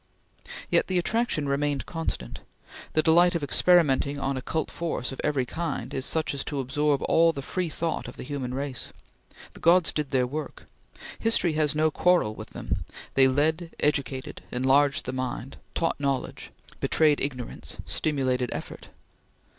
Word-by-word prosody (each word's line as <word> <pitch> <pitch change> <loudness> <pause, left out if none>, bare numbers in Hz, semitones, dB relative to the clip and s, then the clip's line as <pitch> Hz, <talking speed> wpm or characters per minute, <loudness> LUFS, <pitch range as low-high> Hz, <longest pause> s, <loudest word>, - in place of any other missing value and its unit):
Yet - - +3
the 185 - +1
attraction 180 -5 0
remained 140 0 0
constant. 165 - -4 0.5
The 155 - +3
delight 175 +2 +5
of 165 - -1
experimenting 145 -2 +3
on 135 0 -1
occult 145 +4 -2
force 160 -7 -3
of 135 - -6
every 145 -4 +1
kind 145 -3 -4
is 130 - -1
such 160 -2 0
as 140 - -2
to 145 - -3
absorb 140 +2 +1
all 165 0 +4
the 140 -4 -6
free 180 +3 -2
thought 165 +1 -2
of - - -10
the - - -6
human 130 -2 -4
race. 135 -1 -3 0.6
The - - -13
gods 175 0 +5
did 150 -3 -2
their 130 -2 +2
work; 150 +5 -6 0.5
history 225 -7 +3
has 155 -1 +1
no 155 +1 +3
quarrel 175 -11 +3
with 110 0 -9
them; - - -4 0.3
they 135 -1 +6
led, 160 +5 0
educated, 140 -3 -1
enlarged 140 +4 +3
the - - -3
mind; 130 0 -4 0.2
taught 165 -3 0
knowledge; 140 -2 -2 0.3
betrayed 155 -2 +3
ignorance; 130 -4 -4
stimulated 130 -5 0
effort. - - -7
145 Hz, 155 wpm, -27 LUFS, 130-160 Hz, 0.6 s, they